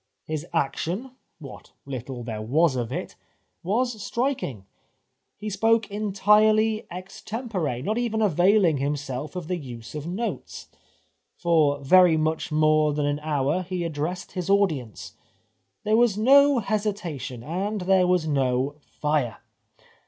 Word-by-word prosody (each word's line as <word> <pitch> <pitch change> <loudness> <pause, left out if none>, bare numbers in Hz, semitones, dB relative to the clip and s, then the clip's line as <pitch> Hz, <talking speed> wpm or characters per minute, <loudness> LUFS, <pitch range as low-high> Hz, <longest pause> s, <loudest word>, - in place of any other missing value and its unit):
His 155 +1 -4
action 170 - -2
— - - -49
what 140 -6 -12
httle 130 -2 -6
there 110 -3 -4
was 140 +6 +2
of 120 -3 -3
it - - -5 0.3
— - - -49
was 245 -4 -1
striking. 200 - -2 0.7
He 215 - -7
spoke 225 +1 +1
entirely 215 +2 +3
extempore, 185 - -4
not 215 +8 -1
even 230 -2 -1
avaiUng 180 -4 +3
himself 140 +1 -3
of 180 -4 -5
the 180 - -1
use 120 -7 -9
of 150 +1 -5
notes. 205 +7 -5 0.7
For 155 -5 +2
very 175 +3 +6
much 155 +1 -1
more 155 0 +3
than 150 0 -1
an 145 0 -1
hour 150 +2 0
he 180 -1 -4
addressed 165 +3 -4
his 180 -1 -4
audience. 160 - 0 0.7
There 215 +1 +2
was 235 -4 +3
no 280 +5 +6
hesitation, 195 - -3
and 195 - -3
there 185 0 +3
was 180 -3 +2
no 135 0 0
fire. 145 -6 -2
170 Hz, 135 wpm, -25 LUFS, 145-210 Hz, 0.7 s, very